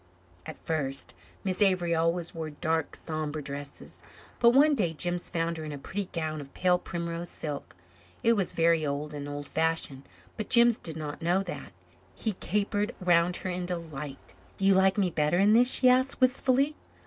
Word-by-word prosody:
At -, -, -7 dB
first 140 Hz, -4 st, -3 dB, 0.3 s
Miss 190 Hz, +1 st, -1 dB
Avery 185 Hz, -4 st, +3 dB
always 165 Hz, +1 st, 0 dB
wore 160 Hz, -2 st, -4 dB
dark 160 Hz, +1 st, -2 dB
sombre 155 Hz, -1 st, -4 dB
dresses. 140 Hz, 0 st, -6 dB, 0.4 s
But 235 Hz, -, +7 dB
one 285 Hz, +5 st, +5 dB
day 185 Hz, -, 0 dB
Jims 175 Hz, +2 st, -2 dB
found 165 Hz, -1 st, -1 dB
her 160 Hz, -, -5 dB
in 155 Hz, -, -5 dB
a 145 Hz, -, -5 dB
pretty 195 Hz, +7 st, -4 dB
gown 155 Hz, -2 st, -3 dB
of 140 Hz, -1 st, -11 dB
pale 180 Hz, -1 st, +3 dB
primrose 170 Hz, -1 st, -4 dB
silk. 145 Hz, -3 st, -6 dB, 0.5 s
It 230 Hz, -, +5 dB
was 200 Hz, -5 st, +1 dB
very 165 Hz, -1 st, +3 dB
old 150 Hz, +1 st, -3 dB
and 145 Hz, -1 st, -5 dB
old 145 Hz, 0 st, -5 dB
fashioned, 160 Hz, -4 st, -1 dB, 0.4 s
but 215 Hz, -, -4 dB
Jims 235 Hz, -1 st, +5 dB
did 160 Hz, -2 st, -4 dB
not 150 Hz, -1 st, -6 dB
know 175 Hz, +4 st, +2 dB
that. 175 Hz, -, -7 dB, 0.4 s
He 220 Hz, -, -2 dB
capered 205 Hz, +3 st, -1 dB
round 175 Hz, -1 st, +3 dB
her 185 Hz, -, -1 dB
in 180 Hz, 0 st, -3 dB
delight. 150 Hz, -6 st, -6 dB, 0.2 s
"You 195 Hz, 0 st, +4 dB
like 190 Hz, +1 st, +4 dB
me 190 Hz, -3 st, +2 dB
better 150 Hz, +2 st, +1 dB
in 200 Hz, +3 st, +5 dB
this?" 245 Hz, +3 st, +6 dB
she 255 Hz, -, +5 dB
asked, 255 Hz, +1 st, +3 dB
wistfully. 260 Hz, +2 st, +3 dB
170 Hz, 180 wpm, -28 LUFS, 155-195 Hz, 0.5 s, But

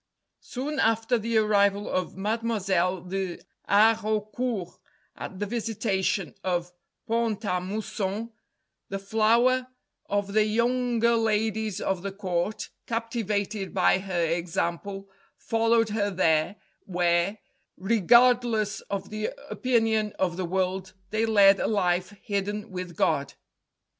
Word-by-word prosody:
Soon 285 Hz, +4 st, -4 dB
after 225 Hz, +2 st, +2 dB
the 230 Hz, +1 st, 0 dB
arrival 205 Hz, -1 st, +3 dB
of 185 Hz, 0 st, -2 dB
Mademoiselle 195 Hz, -4 st, 0 dB
de 185 Hz, -1 st, -3 dB, 0.3 s
Haraucourt 215 Hz, -1 st, +1 dB, 0.4 s
at 190 Hz, -, -7 dB
the 205 Hz, -, -1 dB
Visitation 205 Hz, -4 st, -1 dB
of 175 Hz, -1 st, -1 dB, 0.3 s
Pont 230 Hz, -2 st, -1 dB
a 180 Hz, -2 st, 0 dB
Mousson, 205 Hz, +2 st, -3 dB, 0.6 s
the 195 Hz, -, -2 dB
flower 230 Hz, +5 st, +2 dB, 0.4 s
of 200 Hz, 0 st, -1 dB
the 215 Hz, 0 st, +5 dB
younger 235 Hz, +1 st, +2 dB
ladies 220 Hz, -2 st, 0 dB
of 190 Hz, -3 st, -1 dB
the 200 Hz, +1 st, -4 dB
Court, 190 Hz, 0 st, -2 dB, 0.2 s
captivated 215 Hz, -4 st, -2 dB
by 190 Hz, 0 st, +4 dB
her 185 Hz, -3 st, -1 dB
example, 170 Hz, +3 st, -2 dB, 0.3 s
followed 225 Hz, 0 st, +2 dB
her 205 Hz, -1 st, 0 dB
there, 165 Hz, -2 st, +2 dB, 0.3 s
where, 175 Hz, +2 st, +1 dB, 0.4 s
regardless 230 Hz, +1 st, +3 dB
of 195 Hz, 0 st, -4 dB
the 215 Hz, 0 st, -2 dB, 0.2 s
opinion 225 Hz, -4 st, +1 dB
of 180 Hz, -2 st, 0 dB
the 185 Hz, 0 st, -2 dB
world, 190 Hz, +1 st, -2 dB, 0.2 s
they 220 Hz, +1 st, +1 dB
led 200 Hz, -3 st, +6 dB
a -, -, 0 dB
life 180 Hz, -4 st, +1 dB
hidden 205 Hz, +1 st, -3 dB
with 180 Hz, -2 st, -6 dB
God. 140 Hz, -3 st, 0 dB
205 Hz, 115 wpm, -26 LUFS, 190-225 Hz, 0.6 s, led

